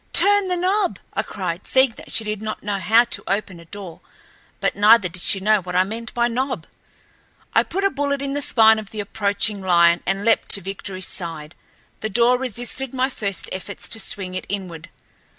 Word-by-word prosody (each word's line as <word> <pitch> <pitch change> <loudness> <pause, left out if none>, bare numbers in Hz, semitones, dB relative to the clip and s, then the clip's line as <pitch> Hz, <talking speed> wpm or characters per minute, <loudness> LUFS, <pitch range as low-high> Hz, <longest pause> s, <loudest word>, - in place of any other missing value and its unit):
"Turn 405 -1 +5
the 360 -1 0
knob!" 375 +2 +1 0.2
I - - 0
cried, - - -5
seeing 260 -1 +4
that - - -10
she 225 - +1
did 210 -1 -4
not 215 0 -5
know 200 -1 -2
how 225 +6 +5
to 235 - -2
open 195 -3 -2
a 170 - -14
door, 185 -1 -9 0.6
but - - 0
neither 210 0 +6
did 175 0 -8
she 195 - +3
know 210 +1 +3
what 180 0 -6
I 185 - +5
meant 225 +3 -6
by 240 0 +2
knob. 255 +3 -2 0.9
I - - +5
put 390 +2 -3
a 395 - +3
bullet 280 0 -1
in 275 0 -3
the 290 - -1
spine 220 -4 +5
of 210 -2 -9
the 215 - -7
approaching 205 0 0
lion 170 -2 +4
and 195 +2 -1
leaped 230 - +2
to 200 - +3
Victoryl's 190 0 -6
side. 160 -3 -6 0.5
The 220 - -3
door 240 +4 +3
resisted 255 +1 -3
my 260 +1 +1
first 200 -6 -4
efforts 190 +2 -6
to 225 - -1
swing 190 -2 -3
it 185 - -5
inward. 180 -4 -5
210 Hz, 205 wpm, -21 LUFS, 190-245 Hz, 0.9 s, neither